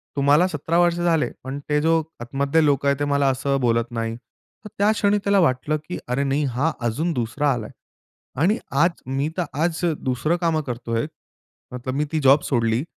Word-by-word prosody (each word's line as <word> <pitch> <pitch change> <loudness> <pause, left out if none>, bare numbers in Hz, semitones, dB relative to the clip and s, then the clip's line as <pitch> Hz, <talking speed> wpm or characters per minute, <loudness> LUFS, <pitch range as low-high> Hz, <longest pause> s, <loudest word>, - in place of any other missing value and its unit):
तुम्हाला 145 +4 +4
17 160 0 -1
वर्ष 175 -1 +3
झाले, 170 -2 +1
पण 135 +2 -5
ते 150 0 +2
जो 165 +1 +3 0.2
आतमधले 140 +6 +1
लोकं 140 -1 +2
आहेत 140 -1 +2
ते 145 - 0
मला 140 -1 +2
असं 135 +1 0
बोलत 115 0 +1
नाही. 115 -1 -3
तर 170 - -18
त्या 205 +2 +3
क्षणी 205 -1 +2
त्याला 200 0 +3
वाटलं 155 -1 +1
की, 180 - -4
"अरे, 125 +3 0
नाही 140 +2 0
हा 155 +6 +1 0.2
अजून 155 +10 -1
दुसरा 140 +4 0
आलाय" 110 -3 -5 0.7
आणि 205 +7 +3 0.2
आज 170 0 +1
मी 135 +3 -1
तर 180 - +1 0.2
आज 170 -1 0 0.2
दुसरं 130 +6 0
कामं 160 -2 +1
करतोय. 120 +1 -2 0.7
मतलब 125 +1 -4
मी 150 +2 0
ती 160 - 0
जॉब 140 +2 +6
सोडली. 115 -1 +1
140 Hz, 185 wpm, -22 LUFS, 130-165 Hz, 0.7 s, जॉब